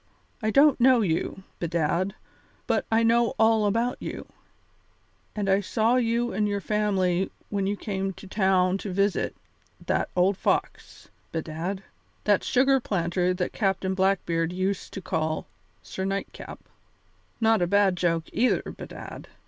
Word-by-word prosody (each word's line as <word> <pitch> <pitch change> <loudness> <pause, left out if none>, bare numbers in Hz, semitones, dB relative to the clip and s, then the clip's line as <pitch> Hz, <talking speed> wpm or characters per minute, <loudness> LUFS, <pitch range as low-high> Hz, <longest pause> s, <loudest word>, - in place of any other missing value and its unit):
I 215 - 0
don't 280 +2 +5
know 255 -1 +6
you, 190 0 -1 0.2
bedad, 170 +3 0 0.5
but - - 0
I 225 +1 +4
know 230 0 +3
all 220 -1 +4
about 230 +4 0
you, - - -6 1.1
and 205 -2 -2
I 195 +1 +3
saw 225 +4 +2
you 240 0 0
and 210 +2 +1
your 200 0 -1
family 195 -3 0 0.2
when 200 -2 -1
you 205 +1 -1
came 195 -2 -3
to 195 - -13
town 190 -1 +2
to 200 - -5
visit 200 +2 0 0.5
that - - 0
old 185 +2 +3
fox, - - -2 0.2
bedad, 165 +4 -4 0.4
that 205 -2 +3
sugar 270 +1 +3
planter 180 -4 0
that 180 0 -2
Captain 190 -2 0
Blackbeard 185 -3 +1
used 185 +2 -2
to 195 - -5
call 155 -1 -1 0.4
Sir 190 - -5
Nightcap. 195 +1 -4 0.8
Not 225 -3 +3
a 175 - +2
bad 200 0 +3
joke, 170 -2 +1
either, 245 +4 +2
bedad. - - -9
195 Hz, 140 wpm, -26 LUFS, 180-220 Hz, 1.1 s, know